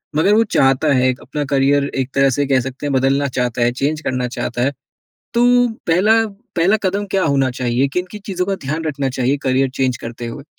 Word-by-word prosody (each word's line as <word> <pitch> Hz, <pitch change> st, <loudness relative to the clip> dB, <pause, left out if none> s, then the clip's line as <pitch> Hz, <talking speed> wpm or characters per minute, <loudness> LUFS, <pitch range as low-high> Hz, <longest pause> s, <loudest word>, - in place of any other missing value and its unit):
मगर 195 Hz, +7 st, +3 dB
वो 225 Hz, +1 st, +5 dB
चाहता 135 Hz, +2 st, +3 dB
है 130 Hz, 0 st, +3 dB
एक 125 Hz, -, -2 dB
अपना 145 Hz, +3 st, -4 dB
करियर 140 Hz, +1 st, +2 dB, 0.2 s
एक 130 Hz, -, -11 dB
तरह 135 Hz, 0 st, +4 dB
से 145 Hz, -, +2 dB
कह 135 Hz, -1 st, +3 dB
सकते 130 Hz, +3 st, -6 dB
हैं, 145 Hz, -, -1 dB
बदलना 135 Hz, +2 st, +2 dB
चाहता 125 Hz, -1 st, -1 dB
है, 120 Hz, +1 st, +3 dB
चेंज 150 Hz, +5 st, -2 dB
करना 125 Hz, -3 st, -2 dB
चाहता 120 Hz, 0 st, -3 dB
है। 135 Hz, +3 st, +2 dB, 0.6 s
तो 240 Hz, +1 st, +3 dB, 0.4 s
पहला 215 Hz, +7 st, +3 dB, 0.3 s
पहला 185 Hz, +6 st, +3 dB
कदम 200 Hz, +2 st, -1 dB
क्या 190 Hz, -2 st, +1 dB
होना 135 Hz, -3 st, +2 dB
चाहिए? 125 Hz, +2 st, 0 dB
किन-किन 180 Hz, +7 st, -4 dB
चीज़ों 180 Hz, -2 st, -2 dB
का 195 Hz, -, 0 dB
ध्यान 155 Hz, +4 st, -2 dB
रखना 140 Hz, -3 st, -2 dB
चाहिए 130 Hz, +3 st, +1 dB
करियर 130 Hz, 0 st, +2 dB
चेंज 130 Hz, -2 st, +1 dB
करते 120 Hz, 0 st, -7 dB
हुए? 135 Hz, +4 st, -7 dB
140 Hz, 210 wpm, -18 LUFS, 130-165 Hz, 0.6 s, वो